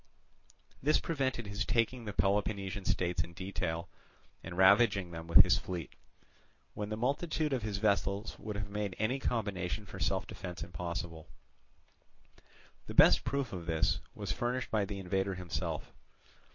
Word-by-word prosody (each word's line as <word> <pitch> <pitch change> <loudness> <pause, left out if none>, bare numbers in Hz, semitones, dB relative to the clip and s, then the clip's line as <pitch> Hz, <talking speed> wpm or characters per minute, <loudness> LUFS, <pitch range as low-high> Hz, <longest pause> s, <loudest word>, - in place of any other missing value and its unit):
This 150 +3 +4
prevented 130 -7 -1
his 100 +1 -2
taking 115 +2 +1
the 105 - -3
Peloponnesian 100 0 0
states 90 -3 +1
in 85 +1 -7
detail, 90 -2 -3 0.6
and 85 - -7
ravaging 100 -1 +5
them 85 0 -7
with 85 - +9
his - - +3
fleet; 90 -3 -5 0.8
when 105 0 -4
the 110 - -3
multitude 150 +4 0
of 130 - 0
his 105 -2 -2
vessels 100 0 0
would 105 -1 -5
have 100 0 -3
made 105 -3 -2
any 120 +6 0
combination 100 -5 -2
for - - -9
self - - 0
defence 90 -3 -6
impossible. 85 -1 -5 1.6
The - - -6
best - - +7
proof 140 -4 -2
of 85 -3 -6
this 80 -1 +2 0.2
was 100 -3 -3
furnished 125 +5 -2
by 105 -2 +2
the 100 0 -5
invader 95 +1 -1
himself. 90 -2 -4
100 Hz, 150 wpm, -33 LUFS, 90-110 Hz, 1.6 s, with